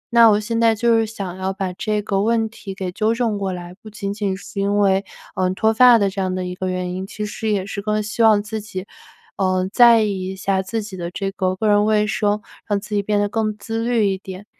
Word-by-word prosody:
那 230 -1 +8
我 210 -1 +4
现 230 +2 -2
在 225 -1 +4
就 230 +1 +3
是 225 - 0
想 195 -4 -6
要 190 0 -2
把 190 -2 -3
这 215 +2 -1
个 195 -2 0
问 225 +1 +1
题 210 -3 -9
给 190 -2 -4
纠 220 +5 0
正 230 -3 0
过 195 -1 -2
来， 175 0 -7
不 215 - -11
仅 200 -1 -4
仅 200 -2 -2
是 200 +1 -8
因 200 +1 +1
为， 195 -1 +3 0.3
嗯， 185 0 0
脱 220 +3 +2
发 250 0 +7
的 200 -3 +2
这 195 0 -3
样 185 -1 -1
的 185 0 -3
一 180 - -4
个 185 0 -3
原 180 -1 -3
因， 190 +1 -5
其 210 +1 -5
实 220 +1 -4
也 200 -3 0
是 200 0 -5
更 210 0 -1
希 215 +3 -3
望 215 -2 +5
自 215 0 -5
己， 190 -3 -7 0.5
呃， 185 -1 +1
在 235 -3 +7
意 195 -3 -2
一 190 - -5
下 190 0 0
自 215 +3 -3
己 205 -2 -8
的 170 -1 -4
这 195 +1 -3
个 185 -2 -1
个 215 +3 -1
人 205 0 +4
卫 210 -1 +3
生， 210 -1 0 0.2
让 205 -1 +1
自 210 +1 -9
己 205 - +2
变 205 +1 0
得 205 - +1
更 215 0 -2
自 225 +2 -4
律 235 -3 +2
一 190 -1 -1
点。 190 +1 -9
205 Hz, 280 characters per minute, -20 LUFS, 190-220 Hz, 0.5 s, 那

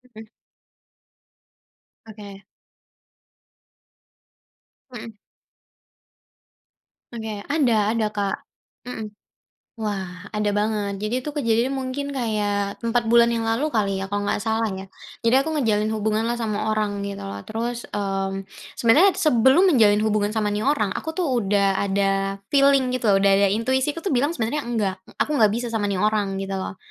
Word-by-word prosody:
Heeh. 220 - -10 1.8
Oke. 205 -2 -11 2.5
Hmm. 230 -2 -8 2.0
Oke 220 -3 -6
ada 235 -8 +2
ada 225 -2 0
Kak, 200 -2 -1 0.5
hmm. 220 -4 -6 0.7
Wah, 195 -2 -4
ada 210 -1 0
banget 205 -1 -1
jadi 240 +5 -2
itu 300 - -4
kejadian 240 -3 +1
mungkin 270 +1 -3
kayak 205 -5 -1
4 230 0 0
bulan 235 0 +5
yang 230 -1 -1
lalu 275 +7 0
kali, 200 -3 0
ya, 190 - -3
kalau 205 +1 -2
nggak - - -1
salah, 225 0 0
ya. 190 -1 -6 0.4
Jadi 230 +2 +4
aku 280 - -2
menjalin 225 -9 +1
hubunganlah 220 +2 -1
sama 215 -2 -2
orang 210 -2 -1
gitu 200 - -5
loh, 100 0 -6
terus, 235 - -4
mmm, 195 -1 -3 0.3
sebenarnya 315 +12 +5
sebelum 300 - +4
menjalin 215 -5 +4
hubungan 215 -1 +1
sama, 210 -1 -1
nih, 205 - -1
orang, 215 -10 +1
aku, 320 +11 -5
tuh, 365 - 0
udah 200 -4 +1
ada 195 0 0 0.2
feeling 275 -2 +4
gitu 250 -3 -1
udah 195 0 +3
ada 200 0 +4
intuisi 260 +8 0
aku, 330 - -7
tuh, 390 - 0
bilang 285 +6 +1
sebenarnya 235 +7 -1
enggak, 210 -5 -1 0.2
aku - - -1
nggak 215 - +6
bisa 235 +3 -2
sama, 210 -2 0
nih, 195 -2 -1
orang 205 -2 0
gitu 195 0 -4
loh. 190 0 -4
215 Hz, 145 wpm, -23 LUFS, 200-240 Hz, 2.5 s, nggak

